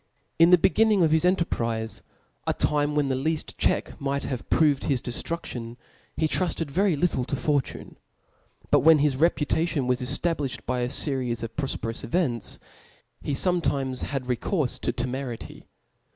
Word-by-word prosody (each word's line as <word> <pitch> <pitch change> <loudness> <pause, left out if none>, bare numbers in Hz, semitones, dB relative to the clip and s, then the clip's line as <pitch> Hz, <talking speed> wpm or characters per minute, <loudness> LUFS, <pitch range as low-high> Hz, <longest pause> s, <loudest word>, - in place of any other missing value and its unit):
In 165 +1 +7
the 180 - +8
bc^nningof 195 -2 +3
his 160 +2 +3
enterprize, 115 -11 0 0.5
a - - +1
time 145 0 +1
when 145 -2 +1
the 130 - +1
kaft 160 0 -1
check - - 0
might 140 0 -1
have 130 -4 -5
proved 150 -4 +3
his 135 -4 +1
dcftruftion, 120 -2 -4 0.4
he 160 - +2
trufted 165 -3 -1
very 190 +2 +2
little 145 -4 0
to 140 - -2
fortune 140 0 -2 0.7
5 - - -27
but - - +6
when 160 0 +6
his 145 -2 +1
re 165 +5 +5
putation 160 -2 -1
was 125 0 0
eftablilhed 140 +1 -2
by 125 0 -1
a 120 - 0
feries 125 -3 -2
of 115 0 -6
proTperous 125 -5 -3
events, 150 -10 -1 0.6
he 145 - -3
fometimes 135 -6 0
had 135 -2 -3
recourfe 125 - -1
to - - -1
temerity. 125 -1 -5
140 Hz, 155 wpm, -26 LUFS, 125-165 Hz, 0.7 s, the